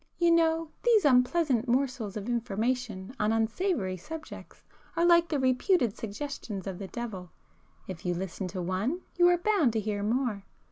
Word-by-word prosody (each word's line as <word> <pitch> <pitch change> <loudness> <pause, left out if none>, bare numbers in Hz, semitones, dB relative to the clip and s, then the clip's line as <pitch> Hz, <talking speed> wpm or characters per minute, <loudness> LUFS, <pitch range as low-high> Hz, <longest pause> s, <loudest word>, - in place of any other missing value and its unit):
You 345 -1 +4
know 325 -1 +2
these 460 -6 +4
unpleasant 260 -1 +3
morsels 245 -5 0
of 205 +1 -6
information 235 -2 -2
on 210 +1 +2
unsavoury 225 - 0
subjects 315 - -10 0.3
are 335 +1 +2
like 340 -1 +5
the 300 - 0
reputed 260 - +2
suggestions 220 -3 -6
of 190 -2 -5
the 195 - -5
devil,—if 185 -4 -9
you 175 -1 -1
listen 190 +1 -4
to 180 0 -4
one, 205 - -1 0.2
you 350 0 +6
are 355 0 +5
bound 350 - +2
to 225 - +1
hear 210 -1 -2
more. 225 -1 -1
240 Hz, 155 wpm, -29 LUFS, 200-320 Hz, 0.3 s, you